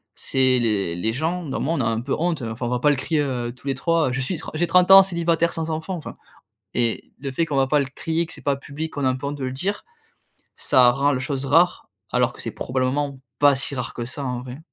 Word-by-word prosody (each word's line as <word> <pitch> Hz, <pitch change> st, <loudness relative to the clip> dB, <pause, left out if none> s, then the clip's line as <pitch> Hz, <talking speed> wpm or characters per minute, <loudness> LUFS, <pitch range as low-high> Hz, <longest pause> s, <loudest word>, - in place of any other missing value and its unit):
c'est 130 Hz, -1 st, +2 dB
les 100 Hz, -7 st, 0 dB
les 110 Hz, +6 st, -1 dB
gens, 165 Hz, +6 st, -2 dB
bah, 135 Hz, -, -2 dB
moi, 160 Hz, +4 st, 0 dB
on 140 Hz, -, 0 dB
a -, -, 0 dB
un 115 Hz, 0 st, 0 dB
peu 130 Hz, +3 st, -3 dB
honte, 165 Hz, -2 st, -1 dB
heu, 115 Hz, -, -3 dB
enfin 115 Hz, +2 st, -5 dB
on -, -, -2 dB
va 125 Hz, 0 st, 0 dB
pas 150 Hz, -, +3 dB
le -, -, +2 dB
crier, 155 Hz, +3 st, 0 dB
heu, 125 Hz, -4 st, -2 dB
tous 135 Hz, -, -13 dB
les 135 Hz, -, 0 dB
trois, 165 Hz, -1 st, +1 dB
je 125 Hz, -, -2 dB
suis 130 Hz, +8 st, -1 dB
tr -, -, -8 dB
j'ai 175 Hz, +2 st, +1 dB
30 180 Hz, +1 st, +4 dB
ans, 195 Hz, 0 st, +12 dB
célibataire, 170 Hz, -2 st, +1 dB
sans 165 Hz, 0 st, -3 dB
enfant, 160 Hz, +4 st, -3 dB
enfin 160 Hz, -, -8 dB, 0.6 s
et, 120 Hz, -2 st, -1 dB
le 135 Hz, -1 st, -4 dB
fait 165 Hz, +5 st, 0 dB
qu'on 145 Hz, -3 st, -2 dB
va 135 Hz, 0 st, +3 dB
pas 150 Hz, +1 st, +3 dB
le 140 Hz, -, -1 dB
crier, 165 Hz, +1 st, -1 dB
que 165 Hz, -, -12 dB
c'est -, -, -13 dB
pas 140 Hz, -, +1 dB
public, 145 Hz, +3 st, -6 dB
qu'on 145 Hz, -, -3 dB
a -, -, +4 dB
un 130 Hz, -, -1 dB
peu 130 Hz, -, -6 dB
honte 145 Hz, +1 st, -3 dB
de 135 Hz, -, -4 dB
le 130 Hz, -, -3 dB
dire, 195 Hz, +10 st, -2 dB, 0.7 s
ça 125 Hz, -1 st, +5 dB
rend 140 Hz, +3 st, +1 dB
les 130 Hz, -, -2 dB
choses 135 Hz, 0 st, -3 dB
rares, 165 Hz, +6 st, +3 dB, 0.2 s
alors -, -, +2 dB
que -, -, -12 dB
c'est -, -, -4 dB
probablement 130 Hz, +2 st, -2 dB, 0.2 s
pas 145 Hz, -1 st, +6 dB
si 135 Hz, +1 st, -2 dB
rare 125 Hz, -2 st, -4 dB
que 120 Hz, -, -4 dB
ça, 135 Hz, +4 st, -6 dB
en 125 Hz, -1 st, -3 dB
vrai. 125 Hz, +2 st, -9 dB
140 Hz, 275 wpm, -23 LUFS, 130-160 Hz, 0.7 s, ans